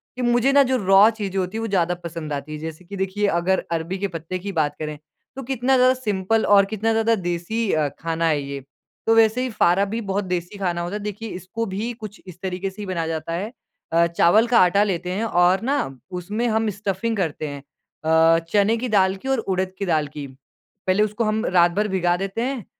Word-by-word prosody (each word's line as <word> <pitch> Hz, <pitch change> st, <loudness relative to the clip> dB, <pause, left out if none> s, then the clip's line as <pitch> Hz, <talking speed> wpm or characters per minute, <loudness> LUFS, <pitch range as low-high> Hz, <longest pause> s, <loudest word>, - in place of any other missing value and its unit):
कि 255 Hz, -, -5 dB
मुझे 240 Hz, +2 st, +3 dB
ना 280 Hz, 0 st, +6 dB
जो 260 Hz, -1 st, +1 dB
रॉ 195 Hz, +3 st, +7 dB
चीज़ें 205 Hz, -4 st, -4 dB
होती 185 Hz, +3 st, -3 dB
हैं -, -, -2 dB
वो 225 Hz, -, -2 dB
ज़्यादा 180 Hz, -4 st, +1 dB
पसंद 165 Hz, -3 st, -5 dB
आती 140 Hz, +1 st, -5 dB
हैं। 150 Hz, -, -6 dB
जैसे 160 Hz, +3 st, -7 dB
कि 200 Hz, +3 st, -8 dB
देखिए 195 Hz, +2 st, 0 dB
अगर 180 Hz, +1 st, +1 dB
अरबी 165 Hz, +3 st, -2 dB
के 200 Hz, +1 st, -1 dB
पत्ते 170 Hz, 0 st, -5 dB
की 200 Hz, +2 st, -5 dB
बात 150 Hz, -5 st, 0 dB
करें 150 Hz, -1 st, -4 dB, 0.4 s
तो 270 Hz, -, -6 dB
कितना 265 Hz, +1 st, +1 dB
ज़्यादा 255 Hz, 0 st, +5 dB
सिंपल 220 Hz, -3 st, 0 dB
और 200 Hz, -1 st, +6 dB
कितना 220 Hz, +2 st, -1 dB
ज़्यादा 225 Hz, +1 st, +2 dB
देसी 185 Hz, +4 st, -2 dB
अ, 155 Hz, -2 st, +2 dB
खाना 165 Hz, 0 st, -1 dB
है 150 Hz, -3 st, +1 dB
ये। 140 Hz, 0 st, -5 dB, 0.5 s
तो 225 Hz, -, +5 dB
वैसे 225 Hz, +2 st, +4 dB
ही 255 Hz, -, -1 dB
फारा 195 Hz, -2 st, +3 dB
भी 225 Hz, +3 st, -3 dB
बहुत 200 Hz, -1 st, -2 dB
देसी 180 Hz, +2 st, -3 dB
खाना 175 Hz, -3 st, -1 dB
होता 175 Hz, +4 st, -4 dB
है। 210 Hz, -, -3 dB
देखिए 210 Hz, +2 st, -5 dB
इसको 185 Hz, +6 st, -5 dB
भी 225 Hz, +4 st, -2 dB
कुछ 215 Hz, -3 st, -10 dB
इस 180 Hz, -1 st, -11 dB
तरीके 190 Hz, 0 st, -3 dB
से 190 Hz, +2 st, -10 dB
ही -, -, -5 dB
बनाया 170 Hz, -4 st, -2 dB
जाता 160 Hz, 0 st, -3 dB
है। 195 Hz, +6 st, -3 dB, 0.4 s
अ, 170 Hz, +1 st, +5 dB
चावल 170 Hz, +7 st, +4 dB
का 235 Hz, 0 st, +4 dB
आटा 185 Hz, +3 st, +5 dB
लेते 180 Hz, -3 st, -2 dB
हैं 200 Hz, +4 st, -2 dB
और 180 Hz, -3 st, +3 dB
ना 270 Hz, +5 st, 0 dB, 0.4 s
उसमें 210 Hz, +7 st, -2 dB
हम 220 Hz, -1 st, +1 dB
स्टफ़िंग 205 Hz, +2 st, -2 dB
करते 160 Hz, -4 st, -2 dB
हैं, 145 Hz, -1 st, -6 dB, 0.5 s
अ, 160 Hz, +1 st, +5 dB
चने 210 Hz, +2 st, +3 dB
की 250 Hz, +2 st, -3 dB
दाल 190 Hz, -3 st, +3 dB
की 195 Hz, +7 st, -9 dB
और 265 Hz, -2 st, +2 dB
उड़द 190 Hz, -3 st, -2 dB
की 200 Hz, -, -1 dB
दाल 155 Hz, -4 st, +1 dB
की। 145 Hz, 0 st, -7 dB, 0.6 s
पहले 190 Hz, +3 st, +3 dB
उसको 215 Hz, +2 st, -1 dB
हम 215 Hz, +1 st, 0 dB
रात 175 Hz, -1 st, +4 dB
भर 210 Hz, +4 st, 0 dB
भिगा 180 Hz, -3 st, +1 dB
देते 195 Hz, +4 st, -3 dB
हैं 250 Hz, -4 st, -3 dB
195 Hz, 230 wpm, -22 LUFS, 170-220 Hz, 0.6 s, रॉ